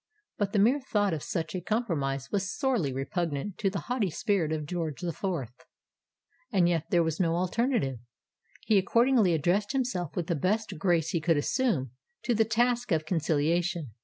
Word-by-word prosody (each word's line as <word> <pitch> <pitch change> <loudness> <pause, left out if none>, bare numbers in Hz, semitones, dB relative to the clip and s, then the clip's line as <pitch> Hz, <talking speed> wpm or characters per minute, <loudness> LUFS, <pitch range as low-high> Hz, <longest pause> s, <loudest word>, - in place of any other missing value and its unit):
But 200 -1 0
the 210 - 0
mere 240 +8 +4
thought 205 -7 0
of 155 - -3
such 160 0 -3
a 185 - -3
compromise 150 - -2
was 195 -2 -1
sorely 250 - +1
repugnant 150 +6 -3
to 195 - +2
the 195 0 -4
haughty 245 -6 -1
spirit 180 -3 0
of 155 -1 -2
George 160 -3 -3
the 175 -2 -2
Fourth: 150 - -3 1.0
and 180 -3 +3
yet 165 -2 0
there 175 -4 +3
was 160 -1 -2
no 165 -3 +2
alternative! 185 - 0 0.7
He 210 -3 +4
accordingly 230 -2 +3
addressed 185 - +1
himself 240 - -2
with 175 - -1
the 170 - -1
best 190 +3 -1
grace 170 -3 +2
he 170 - -1
could 165 0 +2
assume, 145 - 0 0.3
to 245 - +1
the 225 0 +3
task 240 +1 +1
of 155 -2 +1
conciliation. 165 -1 0
180 Hz, 175 wpm, -28 LUFS, 160-215 Hz, 1.0 s, mere